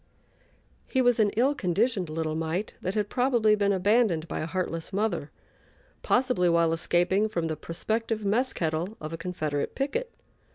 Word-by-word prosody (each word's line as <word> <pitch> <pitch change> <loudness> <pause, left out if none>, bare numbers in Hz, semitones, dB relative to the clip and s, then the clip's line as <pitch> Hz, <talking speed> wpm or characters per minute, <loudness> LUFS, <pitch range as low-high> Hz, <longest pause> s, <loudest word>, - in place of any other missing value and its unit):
He 260 - 0
was 245 -2 +3
an 210 -2 +4
ill 265 +5 +4
conditioned 195 - 0
little 155 0 -2
mite 165 +6 -2
that 185 - -3
had 210 -1 0
probably 240 -3 +2
been 200 -1 +2
abandoned 195 -3 +2
by - - -4
a 155 - -3
heartless 165 -2 -3
mother, 190 -7 -1 0.7
possibly 245 -9 +2
while 170 -1 +3
escaping 175 +5 +2
from 170 -5 -2
the 160 -1 -2
prospective 220 +7 -3
mess 240 +6 +2
kettle 165 +5 -2
of 155 +1 -6
a - - -3
Confederate 155 -5 -3
picket. 470 - -2
190 Hz, 160 wpm, -27 LUFS, 165-225 Hz, 0.7 s, an